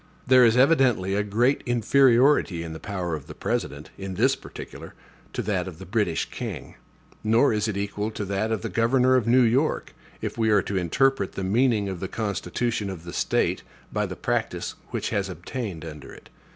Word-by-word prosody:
There 130 0 +6
is 115 0 +5
evidently 125 - +3
a 100 - +2
great 115 +7 +1
inferiority 120 - +4
in 80 -1 -6
the 80 - -8
power 95 -5 -4
of 75 -4 -5
the - - -9
President, 70 +1 -3
in 95 -1 -5
this - - +3
particular, - - -10 0.4
to - - -2
that 95 -4 -1
of 90 -4 -8
the 95 - -10
British 95 -5 0
king; - - -6 0.5
nor 115 +4 +4
is 105 +1 0
it 105 -2 -2
equal 105 +1 -2
to 105 -2 -5
that 100 +3 -1
of 110 -5 -1
the - - -2
governor 125 +3 +3
of 120 -3 +1
New 125 +2 +5
York, 130 +7 +1 0.3
if - - -5
we 110 -1 +2
are 105 -3 +4
to 100 - -4
interpret 100 +5 +1
the 95 - -4
meaning 110 +1 +2
of 95 -2 -4
the 95 - -3
constitution 105 +1 -2
of 90 -4 -7
the 85 - -8
State - - 0 0.3
by - - 0
the - - -6
practice - - -2
which - - -3
has 100 -1 -1
obtained 90 -1 -6
under 75 -3 -9
it. - - -15
105 Hz, 195 wpm, -25 LUFS, 95-120 Hz, 0.5 s, There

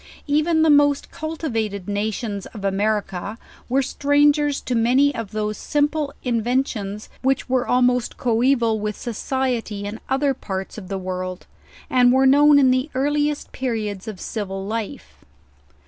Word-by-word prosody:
Even 315 +2 +2
the 320 - +5
most 290 -1 +3
cultivated 225 - -3
na 205 +1 0
tions 205 -2 -4
of 205 -4 -8
America 205 0 -1 0.3
were 270 +2 +2
strangers 290 +1 +2
to 250 - -4
many 255 +5 +3
of 230 -5 -5
those 215 0 -3
simple 295 0 0
in 235 -3 0
ventions, 220 -4 -2
which 265 0 +1
were 255 -1 0
almost 250 -1 +2
coeval 235 -1 +2
with 210 0 -3
society 240 -3 -2
in 210 +2 -5
other 270 +1 +2
parts 190 -4 -5
of 190 - -11
the 195 - -3
world, 185 -1 -5 0.4
and 245 -1 +4
were 265 +1 +4
known 290 +2 +6
in 265 -2 +5
the 255 +4 +1
earliest 290 +2 0
periods 215 -6 -3
of 210 -4 -6
civil 195 -3 -4
life. 220 0 -6
245 Hz, 145 wpm, -22 LUFS, 210-280 Hz, 0.4 s, known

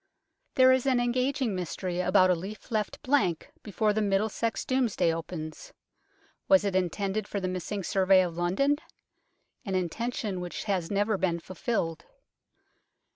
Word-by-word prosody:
There 260 0 +7
is 260 +1 +2
an 255 -2 +3
engaging 250 0 0
mystery 180 0 -3
about 185 0 +4
a - - +3
leaf 195 +8 -8
left 215 -2 -1
blank 255 - +1
before 210 0 0
the 215 - 0
Middlesex 210 +3 0
Domesday 245 -10 +1
opens. 165 - -7 0.7
Was 285 -6 +5
it 195 -2 -1
intended 195 +3 -1
for 200 - -3
the 185 - -2
missing 185 +2 -4
survey 190 0 +4
of 170 -2 -4
London? 190 +13 +1 0.9
an 195 -5 -3
intention 195 +1 -2
which 175 -1 -5
has 190 -5 -1
never 205 0 +1
been 175 -2 0
fulfilled. 175 -2 -3
200 Hz, 140 wpm, -28 LUFS, 180-230 Hz, 0.9 s, There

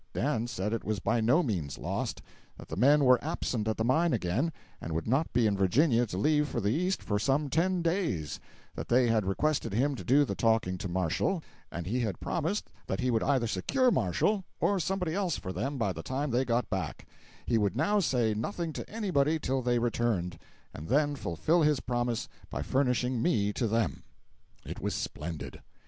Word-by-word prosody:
Dan 120 -3 0
said 105 -2 -2
it 115 - -2
was 110 0 -1
by 110 +3 0
no 125 +11 +4
means 85 - -2
lost; - - -3 0.3
that - - -12
the - - -4
men 140 +6 +5
were 125 -1 +5
absent 110 -3 -2
at 110 - 0
the 110 - 0
mine 160 +6 +3
again, 115 - 0 0.3
and 80 - -4
would 80 +1 -2
not 135 +7 +1
be 120 -1 +2
in 105 -2 +2
Virginia 120 - +3
to 90 - -5
leave 150 +7 +2
for 120 - -2
the 105 -1 +1
East 180 +5 0
for 105 -1 0
some 140 +4 +1
ten 180 +3 +1
days; 165 - -1 0.3
that - - -6
they 120 0 +4
had 110 -4 +2
requested 145 +4 0
him 135 +7 +2
to 130 - -6
do 145 +3 +4
the - - -3
talking 110 -6 +1
to 95 - -4
Marshall, 95 - 0 0.3
and 85 -1 -5
he 115 +7 -1
had 110 -7 -2
promised 175 +5 -2 0.2
that 95 - -2
he 125 0 +1
would 115 -1 +2
either 135 -4 +2
secure 245 - +1
Marshall 210 -2 +1 0.2
or 200 -1 +2
somebody 180 -1 -1
else 185 -5 0
for 95 - -6
them 140 +6 -2
by 105 -6 0
the 80 - -6
time 135 - -2
they 125 +3 +2
got 120 0 0
back; 95 -7 -4 0.4
he 115 - +2
would 105 +1 0
now 205 +8 +2
say 125 - +1
nothing 160 - -3
to - - -6
anybody 160 -9 +1
till 135 -3 -1
they 120 0 +1
returned, 115 -8 0 0.3
and 75 - -8
then 145 +4 +2
fulfil 140 - +1
his 150 -3 +3
promise 120 -1 -1 0.2
by - - -3
furnishing 125 -2 +1
me 105 -9 +1
to 115 - 0
them. 115 -2 0 0.6
It - - -7
was - - -1
splendid. 80 +1 -5
120 Hz, 200 wpm, -30 LUFS, 105-150 Hz, 0.6 s, men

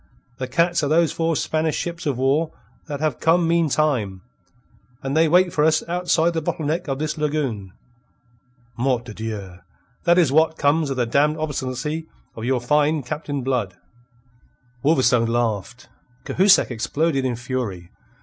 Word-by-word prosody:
The 130 - -3
cats 170 +5 +1
are - - +1
those 160 -1 +3
four 165 0 0
Spanish 155 +1 0
ships 170 -2 -4
of 135 -4 0
war 140 +5 +1 0.4
that 145 -2 -5
have 155 -5 -1
come 165 +1 +3
meantime. 150 - +1 0.8
And 135 +1 -2
they 160 +1 +4
wait 180 +2 +3
for 150 - +2
us 160 0 +3
outside 175 -1 +1
the 165 - -1
bottle 155 0 -3
neck 160 +4 -1
of 135 -1 -2
this 155 +1 -3
lagoon. 135 -11 -2 1.0
Mort 125 0 0
de 110 - -8
Dieu! 105 -5 -6 0.5
That 175 0 +4
is 165 -7 +4
what 160 +2 +3
comes 145 +1 +2
of 135 - -3
the 125 - +1
damned 145 +6 +2
obstinacy 150 +1 -3 0.3
of 110 - -6
your 130 0 +1
fine 150 +4 +1
Captain 145 0 -4
Blood." 120 -8 -1 1.1
Wolverstone 125 -6 +3
laughed. 120 +1 -2 0.4
Cahusac 190 -5 +4
exploded 135 +5 0
in 125 -2 -1
fury. 115 -8 -4
145 Hz, 155 wpm, -22 LUFS, 125-160 Hz, 1.1 s, they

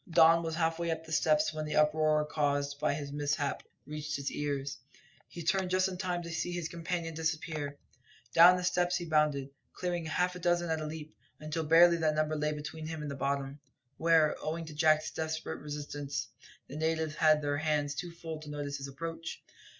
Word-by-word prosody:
Don 165 0 +6
was 165 -1 -3
half 165 0 0
way 170 0 -1
up 160 0 -2
the 160 - -11
steps 155 -1 +3
when 155 0 -3
the 150 - -3
uproar 150 0 +3
caused 145 -1 -1
by 145 - +1
this 145 -1 -5
mishap 145 -1 -1 0.2
reached 150 0 -4
his 140 0 -3
ears. 140 -1 -3 0.5
He 170 - -8
turned 190 +3 +1
just 185 +1 +3
in 185 -1 -5
time 180 -2 -2
to 170 - -6
see 165 +2 -2
his 175 -2 -3
companion 170 0 -3
disappear. 155 -2 -3 0.6
Down 175 +2 +8
the 180 - -3
steps 180 0 +2
he 175 - -2
bounded, 150 -4 +1 0.2
clearing 175 -2 -2
half 180 +3 +1
a - - -6
dozen 175 -1 +1
at 160 -1 0
a 155 - -3
leap, 155 -4 -8 0.2
until 155 +1 -3
barely 170 +2 +7
that 155 -2 +1
number 155 0 +1
lay 150 0 0
between 150 +1 -6
him 160 -1 -5
and 145 - -4
the - - -4
bottom, 140 +1 -2 0.4
where, 160 -2 +4
owing 165 +2 -3
to 155 - -9
Jack's 155 0 +3
desperate 160 0 -3
resistance, 145 -1 -4 0.4
the 140 - -8
natives 160 0 0
had 155 -1 +4
their 145 0 0
hands 150 -1 0
too 175 +5 -4
full 165 -2 -7
to 155 -1 -10
notice 145 -1 -4
his 135 0 -6
approach. 165 +4 -6
155 Hz, 200 wpm, -31 LUFS, 150-165 Hz, 0.6 s, Down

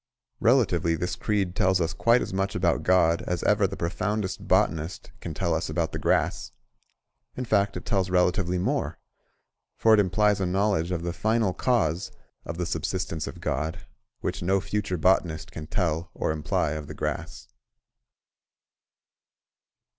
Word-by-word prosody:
Relatively 85 -1 +3
this 90 +1 -2
creed 95 -2 -1
tells 95 0 +3
us 85 0 0
quite 115 +8 +3
as - - -6
much 95 +1 -1
about 90 -2 +1
God 85 -2 +3
as 90 -1 -1
ever - - +3
the - - -7
profoundest 100 +3 -2
botanist 80 +2 0
can 80 -3 -6
tell 85 +2 0
us 80 0 -1
about 80 +1 -1
the - - -4
grass; - - 0 0.8
in 130 - -3
fact, 100 -4 +1
it 90 - -8
tells 95 -3 0
relatively 90 0 +2
more, 90 - -1 0.8
for 110 - +5
it 110 - +6
implies 105 +1 +2
a 95 - +1
knowledge 95 -2 +1
of 85 -2 -2
the 85 0 -2
Final 110 +2 +1
Cause 95 -9 0 0.4
of 85 - -5
the 90 - -1
subsistence 85 0 -2
of - - -8
God, 80 +6 -2 0.4
which 95 +2 -3
no 95 +3 +2
future 100 -1 -2
botanist 85 -2 +1
can 75 -1 -7
tell 85 -1 -1
or - - -1
imply 75 -1 0
of 75 -1 -5
the - - -8
grass. - - -4
90 Hz, 155 wpm, -26 LUFS, 85-100 Hz, 0.8 s, it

